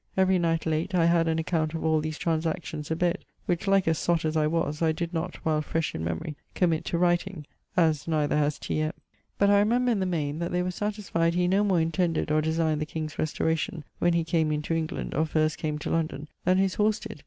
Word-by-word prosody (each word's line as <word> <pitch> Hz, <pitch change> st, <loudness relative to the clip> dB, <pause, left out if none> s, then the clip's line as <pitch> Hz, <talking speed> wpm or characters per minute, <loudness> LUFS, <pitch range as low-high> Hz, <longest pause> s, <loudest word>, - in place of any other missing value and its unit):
Every 190 Hz, -1 st, +4 dB
night 165 Hz, -1 st, 0 dB
late, 160 Hz, +4 st, -1 dB
I 170 Hz, -2 st, +4 dB
had 170 Hz, -1 st, +3 dB
an 160 Hz, 0 st, +1 dB
account 160 Hz, -1 st, -1 dB
of 160 Hz, -, -3 dB
all 160 Hz, -1 st, +3 dB
these 155 Hz, 0 st, -4 dB
transactions 160 Hz, -2 st, -2 dB
abed, 170 Hz, +2 st, 0 dB, 0.2 s
which 175 Hz, +2 st, -1 dB
like 195 Hz, -1 st, +4 dB
a 160 Hz, -, +3 dB
sott 165 Hz, 0 st, 0 dB
as 155 Hz, 0 st, -1 dB
I 155 Hz, -1 st, +3 dB
was, 155 Hz, -1 st, -1 dB
I 160 Hz, -1 st, +3 dB
did 170 Hz, +2 st, -4 dB
not, 170 Hz, +2 st, -2 dB
while 155 Hz, -1 st, +2 dB
fresh 160 Hz, +1 st, -2 dB
in 80 Hz, -, -4 dB
memorie, 85 Hz, -, -3 dB, 0.2 s
committ 165 Hz, -4 st, +1 dB
to 170 Hz, -, -1 dB
writing, 175 Hz, -1 st, 0 dB, 0.3 s
as 160 Hz, -4 st, +2 dB
neither 150 Hz, -3 st, +1 dB
has 150 Hz, -1 st, +1 dB
T. -, -, -3 dB
M.[XXXI.]: 155 Hz, +1 st, -2 dB, 0.4 s
but 200 Hz, 0 st, +4 dB
I 200 Hz, -, +6 dB
remember 240 Hz, +4 st, +2 dB
in 220 Hz, -, +1 dB
the 190 Hz, -, 0 dB
maine, 155 Hz, -4 st, -2 dB
that 170 Hz, 0 st, -2 dB
they 180 Hz, 0 st, +1 dB
were 180 Hz, -, -1 dB
satisfied 180 Hz, -4 st, -1 dB
he 180 Hz, 0 st, +2 dB
no 195 Hz, +3 st, +3 dB
more 190 Hz, -4 st, +2 dB
intended 165 Hz, -1 st, 0 dB
or 155 Hz, 0 st, +3 dB
designed 160 Hz, -1 st, 0 dB
the 155 Hz, -, -2 dB
king's 155 Hz, -1 st, -5 dB
restauration, 160 Hz, +1 st, -1 dB, 0.2 s
when 175 Hz, 0 st, +3 dB
he 170 Hz, -1 st, +2 dB
came 160 Hz, -1 st, +1 dB
into 150 Hz, +2 st, -1 dB
England, 165 Hz, +2 st, -2 dB
or 155 Hz, +3 st, +1 dB
first 155 Hz, 0 st, 0 dB
came 150 Hz, -1 st, -2 dB
to 150 Hz, -, -4 dB
London, 155 Hz, -2 st, -1 dB, 0.2 s
then 185 Hz, +1 st, +4 dB
his 190 Hz, -1 st, +2 dB
horse 210 Hz, 0 st, +2 dB
did. 215 Hz, 0 st, -8 dB
165 Hz, 235 wpm, -27 LUFS, 155-180 Hz, 0.4 s, I